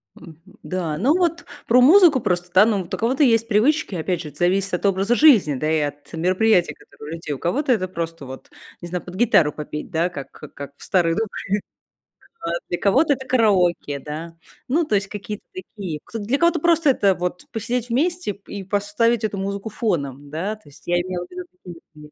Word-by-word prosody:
Мгм. 160 -2 -13 0.3
Да, 170 -5 -3
ну 275 - +3
вот 345 -1 0 0.2
про 250 +2 +5
музыку 320 -1 +7
просто 175 -4 -1
да, 190 +3 +7
ну, 215 -3 +1
вот - - -13
у - - 0
кого-то 260 +6 +1
есть 230 -2 +3
привычки, 230 - +2
опять 175 +1 -2
же, 150 - -7
это 145 - -18
зависит 185 +2 +1
от 180 - -1
образа 195 +4 +2
жизни, 235 - +6
да 155 +4 -1
и 160 - +2
от 145 0 -5
мероприятия, 185 +3 +2
которое 150 +2 -13
у - - -3
людей. 155 -3 -5
У - - -5
кого-то 260 - 0
это 185 -6 +1
просто 165 -4 -5
вот, 130 0 -10 0.3
не 175 - -7
знаю, 180 0 -4
под 180 0 -10
гитару 190 -9 +4
попеть, 150 +2 -7
да, 170 +2 +1
как, 140 -6 -8 0.2
как 140 0 -8
в - - -14
старые 170 -3 +2
добрые. 225 0 0 1.2
А 170 +1 -1
для 175 - -1
кого-то 275 +9 +3
это 265 -1 -7
караоке, 185 - +2
да. 160 +4 -7 0.3
Ну, 320 +7 +2
то 215 - 0
есть 195 -1 0
какие-то 210 +1 -7
такие. 195 - -7
Кто-то, 220 -3 -7
для 265 +6 +1
кого-то 340 0 +2
просто 330 -2 +3
это 200 -7 +3
вот 180 0 -4
посидеть 235 +2 -3
вместе 335 - 0
п 200 - -18
и 200 -1 -5
поставить 205 +4 0
эту 205 -2 -2
музыку 200 +2 -4
фоном, 145 - -3
да, 185 +8 -3
то 215 - -24
есть 145 - -18
я 175 - +2
имела 180 -1 -4
в - - -25
виду 365 0 -6
такие 175 - -12 0.2
мероприятия. 150 0 -14
195 Hz, 210 wpm, -22 LUFS, 170-235 Hz, 1.2 s, музыку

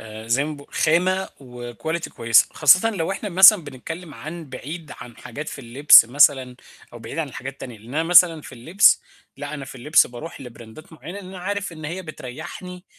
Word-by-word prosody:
آآ 110 0 -11
زي 130 +5 +1
ما 155 - -5
باق 140 -1 -16
خامة 185 +4 +1
وquality 125 +6 -7
كويسة، 115 -1 +3
خاصةً 180 +9 +4
لو 190 -4 -4
إحنا 205 +1 -6
مثلًا 190 -1 +6
بنتكلِم 150 +4 -9
عن 155 +5 -9
بعيد 150 +5 -9
عن 120 -2 -12
حاجات 145 +6 -9
في - - -9
اللبس 130 +2 +6
مثلًا 130 0 +2 0.4
أو 120 - -11
بعيد 140 - -9
عن 155 -3 -2
الحاجات 135 +1 -8
التانية، 125 -4 -11
لأن 110 +3 -17
أنا 160 - 0
مثلًا 175 -1 +5
في - - -12
اللبس، 160 +11 +3 0.3
لأ، 145 +2 -7
أنا 140 -2 -7
في 135 - -12
اللبس 130 +5 +2
باروح 125 +8 -10
لبراندات 120 +5 -13
معيّنة 170 +5 -10
لأن 195 - -11
أنا 190 -1 -10
عارف 200 0 -4
إن 155 -1 -11
هي 175 +5 -6
بتريّحني 165 +5 -10
150 Hz, 195 wpm, -21 LUFS, 125-175 Hz, 0.4 s, مثلًا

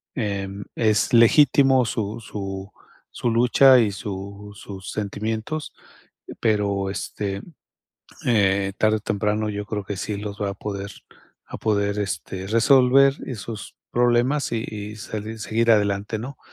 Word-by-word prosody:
em, 100 -4 -3
es 110 0 +2
legítimo 130 +2 +5
su 110 0 -3
su 100 -2 -6 0.4
su 120 - -1
lucha, 125 +3 +6
y 110 -4 +2
su 100 +1 -7
sus 95 -1 -8
sentimientos, 110 +8 -3 0.7
pero, 100 -3 +1
este, 100 0 -4 0.9
eh, 100 -4 +2
tarde 110 0 +3
o - - -5
temprano 105 +1 -1
yo 105 0 -5
creo 105 -2 -4
que 100 0 -5
sí 105 - -3
los 105 0 -6
va 100 -1 0
a - - -6
poder 100 0 -5 0.6
a - - -8
poder, 100 -1 0
este, 95 -1 -4
resolver 130 +4 +5
esos 110 -3 -7
problemas 120 +4 +2
y 115 -1 -1
y 105 0 -7
sali 110 +1 -6
seguir 115 +2 +1
adelante, 105 0 +1
¿no?, 130 +5 -7
105 Hz, 135 wpm, -23 LUFS, 100-115 Hz, 0.9 s, lucha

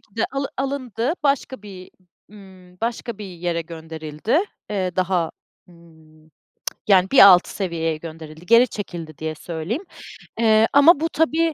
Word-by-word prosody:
ki 205 - -31
de 225 - +1
alı 275 0 -2
alındı. 265 -1 -2
Başka 275 -5 -1
bir 185 -3 -11 0.4
ımm, 185 -3 -16
başka 230 -1 -3
bir 210 - -7
yere 175 -2 -3
gönderildi. 160 - -3 0.3
Eee, 185 -3 -2
daha, 180 -3 0 0.4
ımm, 160 -2 -21 0.6
yani, 190 -1 +5
bir 275 - +6
altı 180 -2 +6
seviyeye 165 -4 -2
gönderildi, 160 +1 -10
geri 235 +3 +6
çekildi 170 -7 -7
diye 155 0 -4
söyleyeyim. 170 - -5 0.6
Eee, 220 -1 +4
ama 285 +2 +7
bu 325 +1 -1
tabii 320 +1 +1
185 Hz, 140 wpm, -22 LUFS, 165-235 Hz, 0.6 s, ama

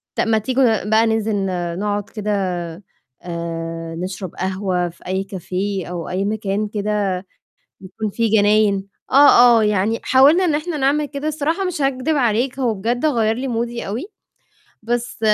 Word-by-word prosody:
طَب - - 0
ما 225 -1 +3
تيجوا 255 +5 +1 0.2
ن - - -4
بقى 220 +1 +4
ننزل 220 -1 0
ن 180 -3 -2
نقعد 205 0 -2
كده 210 -1 -4 0.9
آآ 165 -1 -5
نشرب 185 +1 -6
قهوة 185 -1 -1
في 170 - -16
أي 190 +1 -2
café 190 +1 -3
أو 175 -2 -5
أي 185 +2 -1
مكان 210 0 -1
كده 205 -2 -1 0.7
بيكون 200 +3 -5
فيه 225 0 +2
جناين. 205 -1 +2 0.2
آه، 245 -4 +7
آه - - +2
يعني 210 +2 +1
حاولنا 290 +8 +5
إن 320 - +1
إحنا 310 +2 -2
نعمل 290 +2 +1
كده، 285 +2 -4
الصراحة 310 +5 -1
مش 360 -5 -2
هاكدب 270 +3 0
عليك 245 0 +1
هو 245 -4 +1
بجد 235 +7 -1
غيَّر 225 -7 +2
لي 265 +2 -3
مودي 235 0 -3
أوي، 220 - -4 0.8
بس 240 +1 -3
215 Hz, 160 wpm, -20 LUFS, 190-255 Hz, 0.9 s, آه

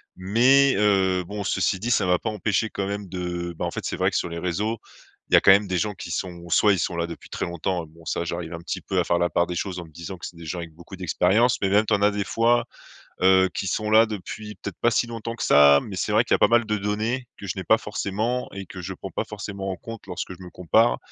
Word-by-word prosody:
mais, 125 +9 +4
euh, 95 -3 +2
bon, 100 +3 -6
ceci 95 - 0
dit, 120 +5 -2
ça 100 -4 +2
m'a 90 0 +4
pas 110 - -3
empêché 110 +1 -1
quand 100 -1 -3
même 100 0 -4
de, 90 -1 -4
bah, - - -1
en - - -3
fait, - - -5
c'est - - -2
vrai - - +2
que - - -1
sur - - -1
les 85 0 -5
réseaux 100 +6 -2 0.5
il - - -6
y - - +9
a - - +8
quand 100 - +6
même 100 +1 +5
des 90 - 0
gens 105 +3 -1
qui 85 - -8
sont 85 +1 -4
ou 85 - -11
soit 105 -2 +5
ils 95 - -1
sont 85 - -2
là 85 0 -1
depuis 85 - -10
très - - -3
longtemps, 85 0 -3
et - - -17
bon, 80 +1 -18
ça, 85 - -2
j'arrive 85 -1 -4
un 85 - -5
petit 85 - -5
peu - - -1
à - - +1
faire 85 - +2
la 85 0 +1
part 85 - +1
des 90 - -4
choses 90 0 -3
en 85 - -7
me - - -16
disant 85 +4 -8
que - - -8
c'est - - -12
des 85 -1 -11
gens 85 - -4
avec 85 -2 -7
beaucoup 85 +4 -12
d'expérience, 95 +7 +2
mais 95 - +1
même, 105 +3 +4
tu 110 - 0
en 100 - +2
as 105 - +4
des 100 -1 -2
fois, 120 +1 +2 0.6
heu, 95 0 +5
qui 95 - -3
sont 105 +3 -1
là 110 +1 +6
depuis 105 +1 -7
peut-être - - -8
pas 120 - +4
si 120 +1 +1
longtemps 115 0 -6
que - - -4
ça, 70 -1 +6
mais 100 - -7
c'est 105 - -1
vrai 110 +3 +4
qu'il - - 0
y - - +7
a - - -2
pas - - +6
mal 120 -1 +3
de 105 0 -1
données 110 +5 -2
que 100 - -9
je 90 - -2
n'ai 95 - -3
pas 110 +5 +4
forcément, 110 +3 -2
et 100 0 -6
que 90 +1 -9
je 95 +1 -6
prends - - -8
pas - - -2
forcément 100 -1 -6
en 95 - -2
compte 115 +4 -10
lorsque 90 +1 -5
je 95 - -16
me 90 - -9
compare. 80 -9 +2
95 Hz, 300 wpm, -24 LUFS, 85-105 Hz, 0.6 s, y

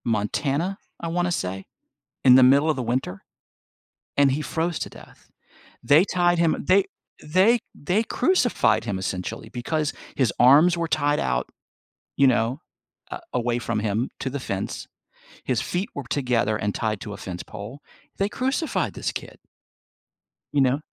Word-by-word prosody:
Montana, 140 - -1 0.2
I 170 - -4
wanna 175 +1 0
say, 95 - -3 0.6
in 125 - +8
the 130 - +7
middle 140 +5 +5
of 155 - 0
the 130 - -2
winter, 120 -5 -3 0.9
and 140 -1 +5
he 145 +3 -1
froze 165 +2 -2
to - - -4
death. - - -16 0.5
They 155 +6 +5
tied 175 -2 +2
him 165 -2 +1
they 190 +1 +5 0.4
they 190 +10 +4
they 180 +9 0
crucified 245 - +2
him 100 -4 -2
essentially 95 +3 -4
because 145 +5 -2 0.2
his 130 -6 +1
arms 150 +8 +6
were 170 -1 -1
tied 145 -2 +1
out, 65 0 -1 0.7
you 140 - +5
know, 125 +2 +1 0.5
a - - -5
away 120 0 0
from 115 -2 -2
him 110 +4 -1
to 130 - -2
the 140 +1 -4
fence, 100 -6 -4 0.6
his 125 -3 0
feet 180 +3 -2
were 140 - -5
together 120 -6 +1
and 105 -1 -2
tied 110 -2 -1
to 105 - -6
a - - -8
fence 90 -2 -6
pole, 105 +7 -9 0.4
they 200 +1 0
crucified 265 +7 -1
this - - -3
kid - - -8 1.1
you 145 - +3
know? 135 +2 +2
135 Hz, 155 wpm, -24 LUFS, 110-170 Hz, 1.1 s, in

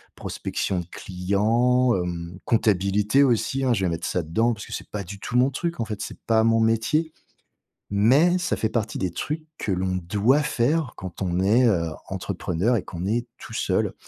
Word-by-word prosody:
prospection 90 -2 -3
de - - -10
clients, 115 +7 +1
hem, 90 -1 -4
comptabilité, 105 +3 +3
aussi, 135 +2 +1
hein, 125 - +3
je 95 -3 0
vais - - +1
mettre 85 0 -3
ça 90 - 0
dedans, 115 +10 +1
parce 105 - -8
que - - -8
c'est - - -6
pas 105 -2 -4
du 100 +2 -9
tout 120 - -5
mon 130 +2 +4
truc, 170 +4 -3
en - - 0
fait, 105 -2 -5
c'est - - -6
pas 110 -1 +4
mon 115 0 +3
métier. 120 +9 +1 0.8
Mais 135 - +4
ça 180 - -1
fait 110 - 0
partie 110 -2 -2
des 95 -2 -1
trucs 155 - -4
que 100 - -2
l'on 95 0 -1
doit 105 - +2
faire 145 0 0
quand 95 +1 -7
on 90 -1 0
est, 110 +7 +4
heu, 85 -7 +2 0.2
entrepreneur 100 +9 -1
et 95 - -2
qu'on 90 +1 -5
est 120 +3 0
tout - - -10
seul. - - 0
110 Hz, 195 wpm, -24 LUFS, 95-125 Hz, 0.8 s, mon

